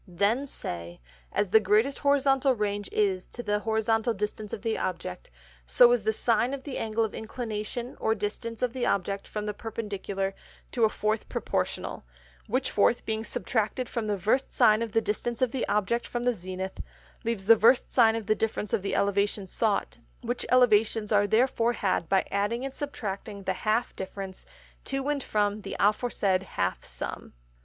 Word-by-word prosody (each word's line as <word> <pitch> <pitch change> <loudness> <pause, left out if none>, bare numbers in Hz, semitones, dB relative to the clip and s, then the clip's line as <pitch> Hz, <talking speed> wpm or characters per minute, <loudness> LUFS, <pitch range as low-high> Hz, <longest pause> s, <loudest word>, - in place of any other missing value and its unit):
Then 205 +10 +1
say, 85 - -6 0.3
_As 200 - 0
the 220 - +8
greatest 220 +6 +2
Horizontal 275 -2 +3
Range 205 -2 -2
is 195 -3 +1
to 240 - -7
the 210 -1 0
Horizontal 225 +1 +1
Distance 210 +1 -4
of 205 - -5
the 225 -1 0
Object: 130 - -4 0.4
So 240 - +7
is 245 -2 +3
the 215 +2 +1
Sine 235 +4 +1
of 270 - -10
the 280 - -5
Angle 225 0 0
of 215 - -6
Inclination 220 +1 -5
or 220 - +1
Distance 225 +3 -4
of 245 -2 0
the 255 -2 -3
Object 200 +1 0
from 210 -1 -4
the 210 - -2
Perpendicular, 200 -3 -4 0.4
to 235 -3 +3
a - - +3
fourth 215 +1 -1
Proportional; - - -2 0.4
which 255 +4 0
fourth 210 +3 +2
being 220 0 -2
subtracted 225 +3 -1
from 230 -2 -3
the 205 -1 0
Versed 220 +8 +1
Sine 220 -3 +5
of 230 -3 -3
the 225 - +3
Distance 230 +3 -2
of 255 -3 +2
the 260 - -2
Object 210 +3 0
from 240 0 -3
the 245 0 +3
Zenith, 185 -1 -6 0.4
leaves 225 -4 -2
the 230 +2 +8
Versed 235 +4 +4
Sine 225 -3 +5
of 225 -2 -3
the 215 - +3
Difference 215 -1 -2
of - - +2
the 195 - -2
Elevations 200 -1 0
sought; 215 -3 0 0.2
which 245 0 -3
Elevations 225 -3 +4
are 205 -1 +4
therefore 235 +1 +2
had 185 -6 -1
by 195 -1 +3
adding 210 +6 0
and 270 - -5
subtracting 205 -8 -5
the - - 0
half 220 +3 0
Difference 190 0 -7 0.4
to 270 +1 -2
and 290 -1 0
from 210 0 0
the - - -6
aforesaid 205 -3 +2
half 90 - -2
Sum. - - -5
220 Hz, 180 wpm, -28 LUFS, 200-240 Hz, 0.4 s, the